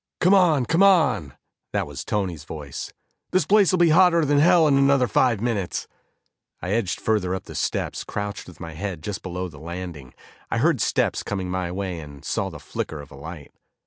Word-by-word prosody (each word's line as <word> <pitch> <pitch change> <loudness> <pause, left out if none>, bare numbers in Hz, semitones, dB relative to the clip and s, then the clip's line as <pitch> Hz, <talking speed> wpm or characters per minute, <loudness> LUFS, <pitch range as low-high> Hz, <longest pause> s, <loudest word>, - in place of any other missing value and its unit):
"Come 180 +3 +4
on, 165 -9 +4
come 165 +9 +2
on," 125 - +4 0.4
That - - 0
was 70 +1 -7
Tony's 95 -8 -2
voice. 75 -5 -7 0.4
"This 185 -4 +2
place'll 195 -1 +4
be 170 -2 +5
hotter 170 -1 +5
than 145 0 +3
hell 170 +1 +5
in 140 - +4
another 135 -2 +4
five 120 0 +2
minutes." 110 -6 -2 0.7
I 90 - -4
edged 105 -4 0
further 100 -4 0
up 95 - -6
the - - -11
steps, - - -2
crouched 105 0 -5
with 90 - -13
my 80 -2 -7
head 85 -1 -5
just 100 +1 -4
below 90 0 -4
the 75 -5 -12
landing. 85 -5 -7 0.3
I - - -1
heard - - +2
steps - - +1
coming 95 -3 -4
my 90 -1 -2
way 95 -2 -4
and 70 -3 -11
saw - - -1
the - - -9
flicker 80 - -5
of 70 0 -11
a - - -11
light. 75 +1 -9
100 Hz, 195 wpm, -24 LUFS, -, 0.7 s, be